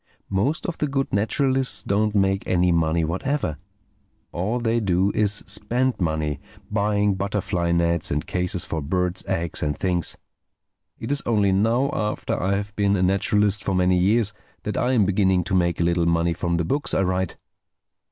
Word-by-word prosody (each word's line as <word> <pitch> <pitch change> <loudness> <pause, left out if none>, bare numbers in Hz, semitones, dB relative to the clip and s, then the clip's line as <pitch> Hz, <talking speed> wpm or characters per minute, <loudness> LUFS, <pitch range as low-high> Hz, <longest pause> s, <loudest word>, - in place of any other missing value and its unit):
Most 110 - 0
of 175 - -4
the 150 - +1
good 135 -1 -2
naturalists 130 +5 +1
don't 105 +1 0
make 95 -1 +1
any 90 -1 +2
money 85 0 +1
whatever. 85 - -2 0.7
All 100 +8 -1
they 115 0 +1
do 95 -1 +1
is 105 0 +1
spend 120 +6 0
money, 80 -4 -1 0.3
buying 105 -1 +1
butterfly 95 -3 -1
nets 85 -1 +1
and 75 +1 -1
cases 90 -1 -1
for 80 - -3
birds' 90 +4 -1
eggs 85 -1 -2
and 75 -1 -1
things. 90 -2 -1 0.8
It - - -5
is 145 - +2
only 105 -4 +3
now, 115 +8 +2
after 105 -1 -2
I 95 +2 +1
have 100 +1 -4
been 100 -1 +2
a 95 - +1
naturalist 100 +2 +2
for 95 - -1
many 90 0 +3
years, 105 +3 +2 0.3
that 105 - -3
I 130 - +1
am 110 -6 +4
beginning 95 -2 +2
to 90 +3 -4
make 85 -2 +1
a - - +2
little 85 0 +1
money 85 0 +2
from 85 +1 -1
the 85 - 0
books 145 - 0
I - - +2
write." 95 -1 -1
95 Hz, 175 wpm, -23 LUFS, 85-105 Hz, 0.8 s, am